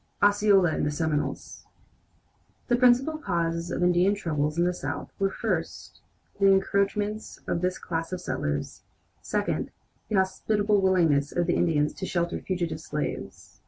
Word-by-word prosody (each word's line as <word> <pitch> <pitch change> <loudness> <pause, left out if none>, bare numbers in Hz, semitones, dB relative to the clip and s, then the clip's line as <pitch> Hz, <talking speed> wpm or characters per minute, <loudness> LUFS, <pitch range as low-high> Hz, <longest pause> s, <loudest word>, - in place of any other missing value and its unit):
OSCEOLA 205 -3 +5
AND - - -1
THE 145 - +1
SEMINOLES 150 -2 -3 1.0
The 240 - +4
principal 255 +5 +3
causes 170 - -1
of 180 - -1
Indian 180 +3 +3
troubles 155 -5 -2
in 170 - +3
the 180 0 +1
South - - -5
were, 195 0 +2
first, - - -4 0.4
the 200 - +5
encroachments 200 +2 0
of 170 - -1
this 180 0 0
class 165 0 -4
of 185 - -3
settlers; 75 - -3 0.4
second, - - -2 0.4
the 215 - 0
hospitable 205 +2 +1
willingness 165 -7 +3
of 175 - 0
the 175 - +1
Indians 150 -3 +1
to 190 - -5
shelter 170 -1 -1
fugitive 170 -4 -3
slaves. 150 -1 -5
180 Hz, 145 wpm, -27 LUFS, 165-200 Hz, 1.0 s, OSCEOLA